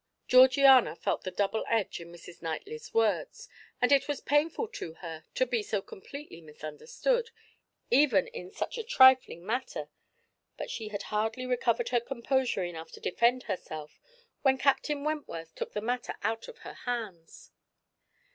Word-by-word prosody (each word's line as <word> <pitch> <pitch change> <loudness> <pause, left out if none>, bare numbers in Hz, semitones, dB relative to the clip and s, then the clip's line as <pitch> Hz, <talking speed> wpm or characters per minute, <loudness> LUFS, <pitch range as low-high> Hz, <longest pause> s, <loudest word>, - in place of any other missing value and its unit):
Georgiana 260 - +7
felt - - -1
the - - -1
double 200 +4 -1
edge 225 -6 0
in 170 0 -10
Mrs. 175 0 -13
Knightley's 405 - -5
words, 225 -2 0 0.3
and 250 - +3
it 280 -1 +5
was 290 -2 -2
painful 310 +9 +1
to 170 - -7
her 160 -3 -8
to 255 - +3
be 240 -2 0
so 210 0 -1
completely 195 - -10
misunderstood, 455 - -2 0.6
even 250 -7 +5
in 180 - -8
such 475 - -4
a - - -3
trifling 260 - +5
matter; 250 +4 -3 0.7
but - - -5
she 220 - -5
had 205 -1 -5
hardly 225 +4 -1
recovered 240 -2 +1
her 240 - +3
composure 250 -3 -1
enough 165 -2 -6
to - - -10
defend 245 +6 +2
herself 155 -6 -6 0.4
when 265 -1 +4
Captain 285 +1 +1
Wentworth 285 - -4
took - - -5
the 210 - -2
matter 245 +2 -2
out 225 +2 -1
of - - -11
her - - -7
hands. 215 -9 -6
235 Hz, 155 wpm, -30 LUFS, 185-270 Hz, 0.7 s, Georgiana